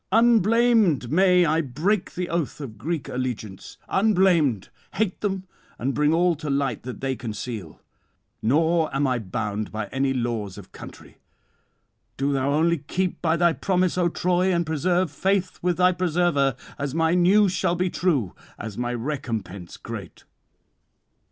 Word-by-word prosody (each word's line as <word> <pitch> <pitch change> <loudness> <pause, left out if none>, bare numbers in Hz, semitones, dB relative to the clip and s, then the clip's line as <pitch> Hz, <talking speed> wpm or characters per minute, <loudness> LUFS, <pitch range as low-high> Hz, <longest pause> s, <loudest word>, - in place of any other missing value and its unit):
unblamed 225 - +4
may 180 +1 +5
I 160 +1 +2
break 165 - -1
the 180 0 -2
oath 170 -5 -2
of 115 -8 -8
Greek 155 +3 -3
allegiance, 120 -6 -5
unblamed 180 - +2 0.3
hate 210 -4 -1
them 195 -2 -2 0.3
and 135 +3 -1
bring 150 0 +2
all 175 +2 +3
to 155 -1 -5
light 140 -4 0
that 125 -3 -8
they 135 0 -1
[159 110 -7 -5
191]conceal; - - -26 0.6
nor 160 +4 +2
am 140 +1 +2
I 130 -2 +1
bound 105 +1 -4
by 110 0 -3
any 135 0 0
laws 115 -6 -2
of 100 - -12
country. - - -12 1.0
Do 140 +1 0
thou 135 0 0
only 165 +2 +2
keep 180 +6 -2
by 165 0 +2
thy 170 -1 +3
promise, 185 -1 0
O 180 -1 +2
Troy, 180 +2 +1
and 170 -1 +1
preserve 175 +2 0
faith 190 +3 0
with 175 -1 0
thy 180 0 +5
preserver, 170 -7 +1 0.2
as 140 0 -3
my 165 0 +2
news 185 +3 +4
shall 175 -1 0
be 180 0 -1
true, 140 - 0 0.2
as 110 +1 -7
my 120 0 -1
recompense 115 - -5
great. - - -8
160 Hz, 155 wpm, -24 LUFS, 125-180 Hz, 1.0 s, may